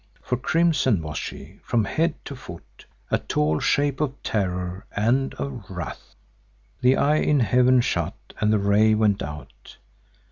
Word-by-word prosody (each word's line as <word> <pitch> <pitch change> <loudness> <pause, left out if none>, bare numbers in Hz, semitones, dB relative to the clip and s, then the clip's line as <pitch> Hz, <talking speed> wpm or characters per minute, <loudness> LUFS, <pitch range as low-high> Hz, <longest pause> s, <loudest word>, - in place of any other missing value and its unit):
For 125 - -1
crimson 135 - +2
was 75 0 -6
she - - -8
from 115 -3 0
head 160 - 0
to 140 - -6
foot; 85 -9 -12 0.2
a - - +2
tall 75 +1 0
shape 145 0 +1
of 140 -3 -1
terror 90 -2 -2
and 125 +6 +1
of 125 -8 -6
wrath. 85 -9 -7 0.7
The 125 +1 +4
eye 150 +2 +3
in 150 -3 +2
heaven 125 +3 +4
shut - - -1 0.3
and 105 0 +3
the 110 - +4
ray 105 +2 +4
went 105 -2 +2
out. 75 +1 -9
110 Hz, 150 wpm, -24 LUFS, 95-135 Hz, 0.7 s, The